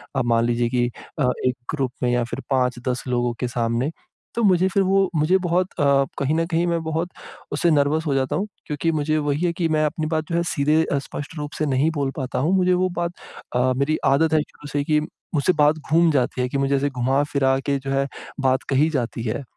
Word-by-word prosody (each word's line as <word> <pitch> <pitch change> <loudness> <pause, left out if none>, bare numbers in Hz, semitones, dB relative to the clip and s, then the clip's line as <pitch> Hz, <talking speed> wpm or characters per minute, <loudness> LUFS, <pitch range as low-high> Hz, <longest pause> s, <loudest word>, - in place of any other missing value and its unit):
अब 130 -2 +1
मान 115 0 +3
लीजिए 120 0 +1
कि 120 0 +1 0.3
अ, 130 -3 +3 0.2
एक 125 - +1 0.2
ग्रुप 135 -4 -1
में 125 - +2
या 120 0 +2
फिर 125 - -4
5-10 125 -1 0
लोगों 120 -1 0
के 125 - -1
सामने। 120 +4 -1 0.4
तो 235 - 0
मुझे 185 -2 +4
फिर 195 +1 +2
वो 195 0 +3
मुझे 155 +5 +3
बहुत 180 +2 +2
अ, - - +2 0.4
कहीं 140 +3 +1
न 165 0 +1
कहीं 170 0 +1
मैं 170 -1 0
बहुत 160 +2 -2 0.4
उससे 150 +4 +2
नर्वस 150 +2 +2
हो 140 - 0
जाता 135 +2 0
हूँ 195 +6 -1 0.2
क्योंकि 160 +2 -1
मुझे 155 0 0
वही 145 +3 0
है 170 - +1
कि 170 -1 0
मैं 155 0 +2
अपनी 155 +1 -2
बात 155 0 -1
जो - - 0
है 170 - +2
सीधे 155 +2 +2 0.2
स्पष्ट 145 +3 -7
रूप 150 0 -4
से 155 - 0
नहीं 140 +2 +2
बोल 140 -2 0
पाता 130 -2 -2
हूँ, 155 +8 +1
मुझे 185 -1 +3
वो 185 +1 +2
बात 170 0 0 0.4
अ, 130 +1 +3
मेरी 150 +3 +1
आदत 155 +4 +3
है 155 - +4
शुरू 150 0 -11
से 145 - +1
कि 150 +1 +2 0.4
मुझसे 150 +6 +3
बात 150 0 +3
घूम 165 0 +5
जाती 130 -2 0
है 125 - +1
कि 140 - -2
मुझे 140 0 +1
ऐसे 140 +1 +1
घुमा 135 +2 +1
फिरा 135 -1 +3
के 140 -1 +1
जो 135 0 -5
है 135 0 +1 0.3
बात 130 0 +2
कही 140 +3 +3
जाती 120 -6 -2
है। 120 +5 -2
145 Hz, 235 wpm, -22 LUFS, 130-160 Hz, 0.4 s, घूम